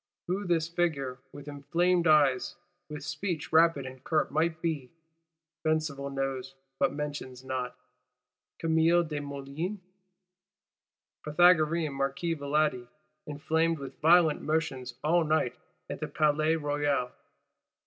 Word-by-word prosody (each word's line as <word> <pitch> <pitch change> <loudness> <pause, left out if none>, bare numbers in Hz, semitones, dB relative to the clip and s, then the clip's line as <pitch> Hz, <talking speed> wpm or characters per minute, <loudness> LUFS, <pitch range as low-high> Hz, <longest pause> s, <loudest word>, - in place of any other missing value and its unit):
Who 190 +2 -2
this 165 -2 +1
figure, 155 -7 -1
with 145 0 -11
inflamed 170 +5 +1
eyes, 145 -5 +3 0.3
with 150 -1 -7
speech 160 -3 -4
rapid 160 -4 +4
and 130 0 -10
curt, 155 -2 0
might 160 +2 0
be? 155 -6 -2 0.7
Besenval 155 -3 -1
knows 135 -1 -3 0.2
but 140 - +3
mentions 145 -3 -5
not. 130 -1 -3 0.8
Camille 165 +1 +3
Desmoulins? 145 +4 -5 1.5
Pythagorean 160 -1 +4
Marquis 140 +5 -1
Valadi, 145 -3 0 0.4
inflamed 160 +3 0
with 135 -2 -9
"violent 165 -1 +5
motions 135 -6 -2
all 170 +3 +3
night 155 -5 +1 0.3
at - - -6
the - - -3
Palais 155 +1 +2
Royal?" 145 -4 0
150 Hz, 110 wpm, -29 LUFS, 140-165 Hz, 1.5 s, violent